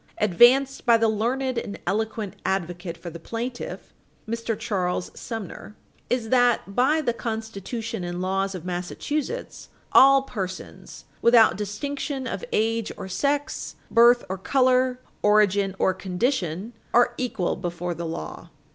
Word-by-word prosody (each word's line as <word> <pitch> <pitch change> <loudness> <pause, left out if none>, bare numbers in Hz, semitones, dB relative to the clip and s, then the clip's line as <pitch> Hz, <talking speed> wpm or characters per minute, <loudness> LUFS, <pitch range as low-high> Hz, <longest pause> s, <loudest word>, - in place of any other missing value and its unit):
206, 210 -2 +1
"advanced 265 +7 +5
by 235 -1 +7
the 225 0 +2
learned 245 +4 0
and 200 - -6
eloquent 215 +1 -2
advocate 175 -2 -2
for 170 +1 -8
the 170 - -9
plaintiff" 240 +7 -6 0.3
(Mr. 230 -1 -2
Charles 185 -5 -2
Sumner), 215 -2 -7 0.3
"is 240 -3 -1
that, 245 -5 +3
by 280 +8 +3
the 240 -5 0
constitution 225 -2 -4
and 175 0 -4
laws 195 +1 -1
of 180 -2 -7
Massachusetts, 265 - -4 0.2
all 275 0 +7
persons 190 -8 -7 0.2
without 235 -2 +6
distinction 265 +7 -4
of - - -4
age 225 0 0
or - - -6
sex, 285 +9 -2 0.2
birth 240 +1 +6
or 190 0 -4
color, 255 +2 +2 0.2
origin 205 -2 +3
or 190 - +2
condition, 190 - -2 0.2
are 240 0 +5
equal 230 -8 -1
before 175 -1 -4
the 170 0 -5
law. 80 - -6
220 Hz, 135 wpm, -25 LUFS, 190-245 Hz, 0.3 s, by